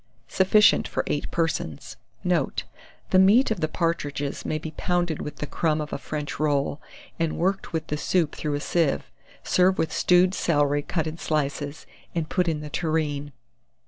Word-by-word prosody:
Sufficient 200 +3 +4
for - - -2
8 145 - -2
persons. 160 - -2 0.3
Note. - - 0 0.5
The 185 - +6
meat 215 +7 +5
of 215 - -1
the 155 - +1
partridges 145 -4 -2
may 155 - -1
be 155 +1 -6
pounded 175 -3 0
with 150 - -5
the - - -4
crumb 155 +1 0
of 150 -1 -4
a - - -3
French 150 -1 -5
roll, 145 0 0 0.4
and 165 -1 0
worked 190 +3 0
with 160 -1 -2
the 150 - -3
soup 165 0 +1
through 150 -2 -2
a - - -1
sieve. 165 -3 0 0.3
Serve 185 +1 +3
with 155 -2 0
stewed 180 +1 +4
celery 145 -5 +2
cut 160 +1 -2
in 160 +1 -5
slices, 145 -1 -2 0.3
and 165 -2 -1
put 180 -2 +1
in 155 -2 -1
the 150 - -7
tureen. 150 -3 -1
155 Hz, 175 wpm, -25 LUFS, 145-175 Hz, 0.5 s, The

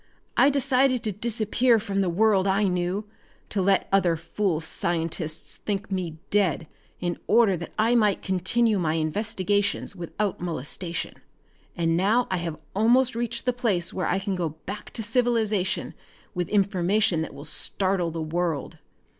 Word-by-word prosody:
"I 280 - +6
decided 265 -3 +2
to 215 - -1
disappear 230 +3 +2
from 200 -2 -1
the 185 - +1
world 200 +1 +3
I 195 +2 +2
knew, 180 +2 0 0.4
to 200 - -1
let 195 +1 +2
other 180 -4 +3
fool 175 0 -1
scientists 165 0 -3
think 200 -1 -4
me 175 -4 -3
dead 195 -6 +2 0.3
in 175 -1 -2
order 220 -3 +4
that 170 - -8
I 225 +2 +3
might 210 -5 +2
continue 200 +4 +1
my 160 -2 0
investigations 200 +5 -1
without 190 +3 -3
molestation. 170 +1 -4 0.6
And 165 -1 +1
now 215 +8 +2
I 185 - +1
have 170 -3 -4 0.2
almost 240 +5 +4
reached 235 +1 -3
the 250 - +2
place 210 -9 0
where 185 -3 -1
I 180 - +1
can 195 0 -2
go 175 -3 -1 0.2
back 205 +2 -6
to 225 - -3
civilization 220 -4 0 0.4
with 180 -3 -2
information 200 -2 +2
that 160 - -5
will 140 - -9
startle 185 +3 +1
the 165 -1 -4
world. 160 -2 -2
195 Hz, 155 wpm, -25 LUFS, 175-220 Hz, 0.6 s, I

